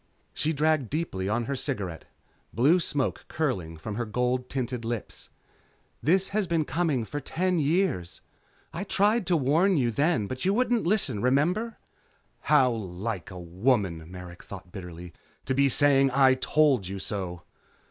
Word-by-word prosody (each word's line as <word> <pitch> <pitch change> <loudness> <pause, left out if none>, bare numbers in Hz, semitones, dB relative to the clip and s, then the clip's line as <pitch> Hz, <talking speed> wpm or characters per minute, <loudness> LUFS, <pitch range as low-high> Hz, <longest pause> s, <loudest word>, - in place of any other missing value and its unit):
'" - - -41
She 155 - 0
dragged 155 -4 +1
deeply 120 - -2
on 120 +3 0
her 140 - -2
cigarette, 105 - -4 0.5
blue 145 +10 +4
smoke 145 -5 -2
curling 95 - -2
from 100 +7 -6
her 120 - -1
gold 125 +3 -1
tinted 125 -2 -3
lips. 115 -2 -5 0.7
"This 185 +5 +2
has 205 -2 0
been 165 -2 +1
coming 150 -4 0
on - - -4
for 145 - -4
ten 180 +5 -1
years. 150 - 0 0.5
I 170 - -3
tried 205 +1 +2
to 175 -2 +3
warn 160 +7 +3
you 120 -4 +1
then, 145 -1 +1
but 130 +5 -5
you 195 +2 +2
wouldn't 240 -5 +1
listen. 155 - +1
Remember?" 170 - +1 0.7
How 135 -4 +5
like 100 -2 -4
a 90 -2 -8
woman, 90 -2 0
Merrick 90 -1 -10
thought 95 -2 -11
bitterly, 90 -3 -9 0.3
to 130 - 0
be 140 +1 +3
saying 135 0 +5
I 135 0 +5
told 130 -5 +2
you 100 +1 -5
so. 95 -3 -5
130 Hz, 160 wpm, -27 LUFS, 100-160 Hz, 0.7 s, How